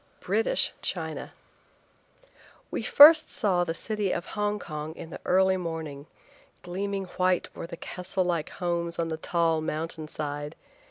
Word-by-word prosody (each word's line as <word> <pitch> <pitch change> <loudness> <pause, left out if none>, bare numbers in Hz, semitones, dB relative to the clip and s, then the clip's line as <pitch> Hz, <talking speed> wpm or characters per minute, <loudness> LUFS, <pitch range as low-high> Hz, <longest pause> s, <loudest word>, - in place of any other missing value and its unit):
BRITISH - - +1
CHINA. - - -4 1.4
WE - - -2
first 310 +2 +8
saw 185 -5 +1
the 165 -1 -3
city 210 0 -2
of 170 - -2
Hong 210 0 0
Kong 155 -3 -6
in 165 - -9
the - - -7
early 190 +1 +3
morning. 160 -5 -5 0.6
Gleaming 195 +2 -3 0.2
white 185 -1 +1
were - - -6
the 170 -1 -8
castle 185 +2 -2
like 170 -3 -1
homes 170 -2 -2
on 165 -1 -1
the 160 - -3
tall 165 -1 +1
mountain 155 0 -3
side. 145 0 -5
175 Hz, 145 wpm, -27 LUFS, 160-190 Hz, 1.4 s, first